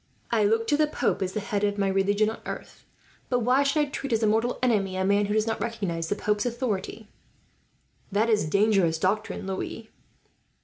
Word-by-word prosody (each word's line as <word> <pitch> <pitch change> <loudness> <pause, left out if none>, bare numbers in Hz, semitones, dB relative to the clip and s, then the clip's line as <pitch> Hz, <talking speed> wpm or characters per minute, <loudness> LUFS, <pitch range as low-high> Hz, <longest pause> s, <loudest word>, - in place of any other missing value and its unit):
I 225 -3 +3
look 225 +2 +2
to 290 +5 +2
the 305 0 +3
pope 300 - -1
as 190 0 -2
the - - -1
head 205 0 -2
of 205 0 +1
my 200 -1 +1
religion 200 +2 +2
on - - -9
earth, - - -8 0.4
but 245 -1 +1
why 250 +4 +3
should 280 +2 +2
I - - +2
treat 275 - -4
as 225 -1 +1
a - - +4
mortal 225 +3 +1
enemy 195 -6 +1
a 190 - 0
man 200 +1 +2
who 205 - -1
does 215 0 +2
not 225 -1 -2
recognize 195 -8 -3
the - - 0
pope's 210 0 0
authority?" 225 -3 -3 1.0
"That 210 +3 +2
is 210 -8 +2
dangerous 195 -4 +3
doctrine, 195 +4 -1
Louis." 195 +3 -5
210 Hz, 205 wpm, -26 LUFS, 195-230 Hz, 1.0 s, a